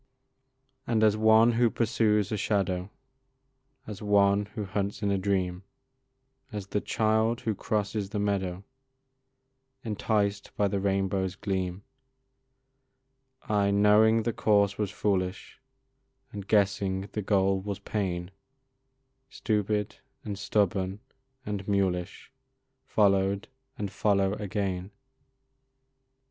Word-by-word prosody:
And 110 -2 +2
as 105 -1 +5
one 110 +2 +5
who 120 0 +3
pursues 110 -3 +1
a - - 0
shadow, 95 -3 -1 1.0
As 105 -2 -8
one 100 -1 +3
who 105 - -3
hunts 100 +1 -3
in 100 - +1
a 100 - +2
dream, 95 -2 -1 0.9
As 105 -3 -5
the 105 - -1
child 110 +1 +1
who 110 - -1
crosses 105 -1 -2
the 105 - -4
meadow, 95 -2 -1 1.2
Enticed 105 -2 -1
by 100 - +3
the 100 0 -1
rainbow's 95 -1 0
gleam, 95 -1 -3 1.6
I 105 -3 +1
knowing 105 +2 +4
the 115 - -1
course 100 -2 +2
was 105 -1 -2
foolish, 95 -1 -2 0.7
And 100 -2 -7
guessing 100 -2 +1
the 105 - -3
goal 95 -1 +2
was 100 0 -4
pain, 90 -4 -3 1.0
Stupid, 105 -4 -1 0.3
and 105 - -3
stubborn, 95 -1 0 0.5
and 100 -2 -4
mulish 95 -1 -1 0.6
Followed 100 -1 +2 0.3
and 100 -2 -4
follow 100 -1 +1
again. 100 -3 -3
100 Hz, 105 wpm, -28 LUFS, 95-105 Hz, 1.6 s, as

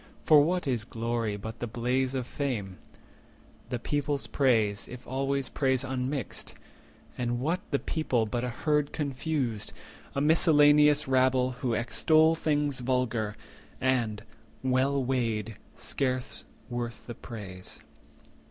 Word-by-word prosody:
For 150 -2 +8
what 175 +4 +1
is 120 -5 0
glory 115 -2 -2
but 110 +3 -7
the 120 - -3
blaze 125 +3 0
of 130 -2 -1
fame, 115 -10 -3 0.9
The 125 - -1
people's 145 +3 -1
praise, 110 -7 +2
if 125 0 -10
always 135 0 -1
praise 130 0 +1
unmixed? 130 -2 -3 0.6
And 120 -1 -1
what 165 +8 0
the 140 - +2
people 130 -7 0
but 120 +3 -2
a 125 - -1
herd 150 +4 0
confused, 135 -6 -2 0.4
A - - +1
miscellaneous 150 -1 +5
rabble, 130 -1 +3
who 125 -2 -2
extol 155 +7 +4
50 165 - -7
Things 145 -3 +1
vulgar, 120 -4 0 0.4
and, 115 -5 0 0.4
well 130 +1 +2
weighed, 115 -4 -1 0.2
scarce 130 -2 -3 0.2
worth 120 -1 -5
the 120 - -6
praise? 100 -6 -8
130 Hz, 125 wpm, -29 LUFS, 115-140 Hz, 0.9 s, For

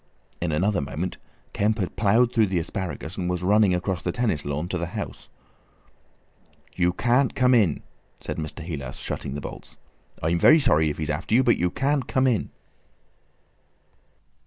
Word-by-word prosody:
In 85 -1 -1
another 95 +4 +1
moment 80 +6 -4 0.4
Kemp 105 +2 +1
had 95 -5 -3
ploughed 115 +4 +3
through 110 -4 +3
the 95 -1 -1
asparagus, 85 0 -4
and 90 -2 -2
was 90 0 -2
running 100 -1 +4
across 90 -1 -2
the - - -2
tennis 115 -12 -1
lawn 75 +4 -3
to 90 - -2
the 85 - -2
house. - - -6 1.5
"You 90 -1 +2
can't 125 +7 +1
come 130 -1 +4
in," 100 - +3 0.4
said - - -5
Mr. 80 +1 -5
Heelas, 75 -6 -6
shutting 70 0 -5
the 75 - -4
bolts. - - -9 0.5
"I'm 85 +2 +1
very 155 - +7
sorry 80 - +3
if 75 - -4
he's 75 -1 -2
after 80 +9 -1
you, 130 - +5
but 120 - +3
you 90 - +1
can't 135 +3 0
come 130 0 +1
in!" 120 -6 +1
90 Hz, 170 wpm, -25 LUFS, 80-115 Hz, 1.5 s, very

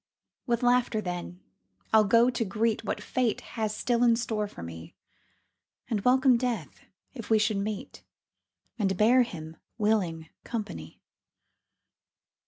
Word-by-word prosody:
With 235 0 0
laughter, 245 -2 +3
then, 180 -2 -5 0.5
I'll 215 -1 +6
go 230 +4 +4
to 240 - -1
greet 220 +2 0
What - - -3
Fate 250 -3 0
has 215 -2 -2
still 240 -1 0
in 235 -1 +5
store 220 -3 -2
for 85 - -10
me, 80 0 -9 1.0
And 210 -3 0
welcome 255 +1 +4
Death 235 - -3 0.3
if 235 -5 -8
we 220 - +5
should 215 0 +1
meet, 205 0 -5 0.8
And 195 -3 0
bear 235 +5 +5
him 160 -9 -5 0.2
willing 185 -8 0
company. 85 - -6
215 Hz, 130 wpm, -28 LUFS, 195-235 Hz, 1.0 s, I'll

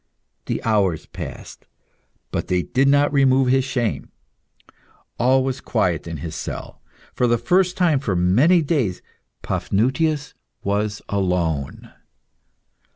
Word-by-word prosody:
The - - -2
hours 100 -7 +1
passed, - - -9 0.6
but - - -3
they 90 -1 +1
did 135 +2 +1
not 145 +1 +3
remove 135 -2 +4
his 130 +1 +3
shame. 120 -4 -2 1.1
All 130 +2 +3
was 130 0 -3
quiet 90 -8 -1
in 80 -4 -6
the 85 - -4
cell. 80 - -7 0.3
For 125 - +1
the 120 0 +3
first 180 +9 +1
time 170 -6 +3
for 105 -8 -2
many 100 - +4
long - - -4
days, 130 - -1 0.4
Paphnutius 140 +7 0 0.3
was 105 +1 -1
alone. 90 -7 -2
120 Hz, 125 wpm, -21 LUFS, 95-135 Hz, 1.1 s, remove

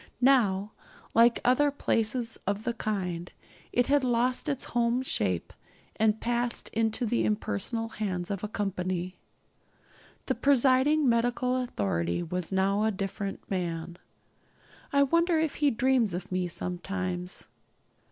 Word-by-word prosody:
Now, 220 -6 +3 0.4
like 235 +1 +5
other 270 +4 +4
places 230 -3 0
of 200 +2 -1
the 240 - -1
kind, 180 -6 -3 0.4
it 245 - +2
had 285 +1 +3
lost 250 +3 +1
its 275 -2 -2
home 240 +1 0
shape, 95 - -1 0.4
and 220 0 +2
passed 240 0 -1
into 225 +2 0
the 115 - +1
impersonal 105 - -1
hands 190 -5 -3
of 200 -1 -4
a - - -1
company. 185 -3 -3 1.1
The - - +1
presiding 275 +2 +3
medical 245 +2 +1
authority 100 - -1
was 180 +1 -3
now 195 +2 +2
a 220 - +3
different 195 -1 -4
man. 170 -2 -3 0.9
I 280 0 +5
wonder 335 +4 +2
if 315 -2 -1
he 290 - +5
dreams 240 -5 +2
of 180 - -6
me 185 -1 0
sometimes? 180 +1 -4
220 Hz, 130 wpm, -28 LUFS, 180-250 Hz, 1.1 s, like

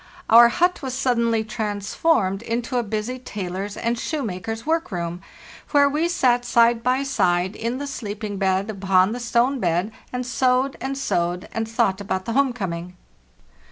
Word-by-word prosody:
Our 235 +1 +9
hut 355 +7 +1
was 260 -3 -4
suddenly 235 -4 +1
transformed 210 - 0
into 235 +2 -2
a - - +2
busy 220 +3 -3
tailor's 200 -3 -5
and 235 0 -1
shoemaker's 225 - -4
work 325 -2 0
room, 175 -1 -4 0.5
where 285 -1 +5
we 305 +4 0
sat 245 -7 +2
side 235 -1 +3
by 255 +3 +1
side 185 -8 +1
in 235 +3 -3
the 285 - -4
sleeping 210 -6 -5
bag 195 +2 0
upon 190 -1 +2
the 245 - -4
stone 240 +3 +1
bed, 175 +2 0 0.2
and 250 0 -3
sewed 255 +2 +1
and 270 +2 -3
sewed 175 -8 -1
and 225 0 -3
thought 195 -3 +1
about 190 -2 -3
the 230 - -2
home 275 0 +3
coming. 180 -6 -5
230 Hz, 160 wpm, -23 LUFS, 195-255 Hz, 0.5 s, Our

